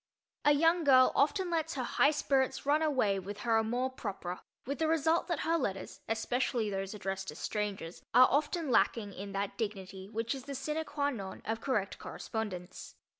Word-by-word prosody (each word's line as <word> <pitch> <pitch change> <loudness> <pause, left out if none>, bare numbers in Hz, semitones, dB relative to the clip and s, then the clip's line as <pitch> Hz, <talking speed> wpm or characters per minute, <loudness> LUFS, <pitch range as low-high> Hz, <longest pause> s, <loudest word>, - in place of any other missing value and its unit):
A 295 - +7
young 330 +3 +3
girl 255 -3 +6
often 345 +6 +2
lets 325 -1 -1
her 260 - -1
high 280 - +3
spirits 275 -3 +1
run 295 +2 +3
away 255 -11 +2
with 205 +2 -7
her 230 -1 +3
amour 245 +4 0
propre, 190 -7 -5 0.3
with 280 +3 -3
the 320 - +2
result 325 +1 +2
that 345 -5 -1
her 330 +1 +1
letters, 195 -7 -3
especially 225 0 0
those 195 +1 -3
addressed 195 -1 -4
to 150 - -5
strangers, 200 -4 -3
are 250 +2 +8
often 300 +1 +1
lacking 215 -3 +2
in 200 +1 -7
that 200 +3 -3
dignity 195 -3 -4
which 225 +2 -2
is 265 -2 -7
the 280 -1 -5
sine 300 +4 -2
qua 285 -2 -1
non 195 -7 -7
of 225 +1 -2
correct 210 -8 -1
correspondence. 195 -5 -6
240 Hz, 180 wpm, -32 LUFS, 200-290 Hz, 0.3 s, are